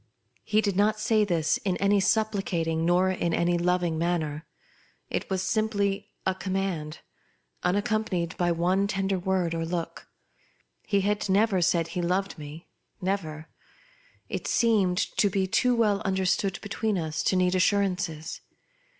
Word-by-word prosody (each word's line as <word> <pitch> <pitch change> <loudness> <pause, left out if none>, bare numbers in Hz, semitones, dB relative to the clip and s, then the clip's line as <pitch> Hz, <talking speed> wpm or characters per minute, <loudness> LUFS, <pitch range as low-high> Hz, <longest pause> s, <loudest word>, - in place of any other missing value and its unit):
He 215 0 +2
did 200 -3 -1
not 210 +2 +2
say 215 0 +3
this 170 -6 +1
in 185 -3 -2
any 200 +1 +3
supplicating, 190 -6 0
nor 180 +2 +3
in 170 -2 -1
any 175 0 +2
loving 175 -2 +1
manner; 160 -3 -1 0.6
it - - -2
was 190 -1 -1
simply 205 -1 0 0.2
a 190 - +2
com 190 0 -5
mand, 175 -6 -3 0.6
unaccompanied 195 -2 0
by 175 -1 +1
one 180 +4 +1
tender 195 -1 -1
word 180 -2 0
or 165 0 -2
look. 170 0 -4 0.8
He 200 -1 +2
had 205 +1 -1
never 195 -1 +3
said 170 -1 +2
he 175 +1 -3
loved 185 +1 -1
me 150 +3 -9 0.2
— - - -48
never; 160 -5 -3 0.8
it - - -4
seemed 205 -6 +2 0.2
to 205 - +4
be 190 0 0
too 245 +6 +2
well 210 -3 +2
understood 190 0 0
between 205 0 -1
us 160 -2 -2
to - - +1
need 180 0 +2
assurances. 185 -4 0
190 Hz, 150 wpm, -27 LUFS, 170-200 Hz, 0.8 s, to